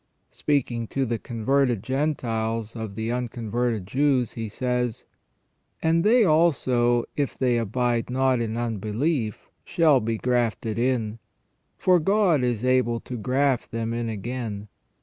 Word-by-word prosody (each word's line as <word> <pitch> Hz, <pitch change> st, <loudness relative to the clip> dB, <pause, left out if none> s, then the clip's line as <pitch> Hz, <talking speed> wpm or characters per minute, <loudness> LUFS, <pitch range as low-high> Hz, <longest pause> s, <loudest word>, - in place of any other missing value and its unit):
Speaking 120 Hz, -6 st, -1 dB
to 135 Hz, +3 st, -1 dB
the 115 Hz, -2 st, -2 dB
con 115 Hz, -3 st, -7 dB
verted 135 Hz, -6 st, +2 dB
Gentiles 115 Hz, -5 st, -2 dB
of 110 Hz, -3 st, -6 dB
the 110 Hz, +2 st, -2 dB
unconverted 120 Hz, -3 st, -2 dB
Jews, 130 Hz, +2 st, +1 dB
he 115 Hz, -2 st, -5 dB
says: 125 Hz, +1 st, -2 dB, 0.4 s
" -, -, -28 dB
And 165 Hz, +1 st, +3 dB
they 230 Hz, +3 st, +5 dB
also, 130 Hz, -, +3 dB
if 145 Hz, -2 st, -2 dB
they 125 Hz, -2 st, +2 dB
abide 120 Hz, +2 st, 0 dB
not 130 Hz, -1 st, +2 dB
in 115 Hz, 0 st, -2 dB
unbelief, 115 Hz, -, -2 dB
shall 160 Hz, -6 st, +3 dB
be 115 Hz, 0 st, -2 dB
grafted 115 Hz, -2 st, 0 dB
in. 115 Hz, -3 st, 0 dB, 0.6 s
For 180 Hz, -1 st, +4 dB
God 185 Hz, -5 st, +2 dB
is 120 Hz, -1 st, -1 dB
able 125 Hz, -2 st, +2 dB
to 125 Hz, -, -7 dB
graft 130 Hz, +3 st, 0 dB
them 115 Hz, -1 st, -3 dB
in 115 Hz, -1 st, -2 dB
again. 110 Hz, -1 st, -5 dB
120 Hz, 140 wpm, -25 LUFS, 115-135 Hz, 0.6 s, they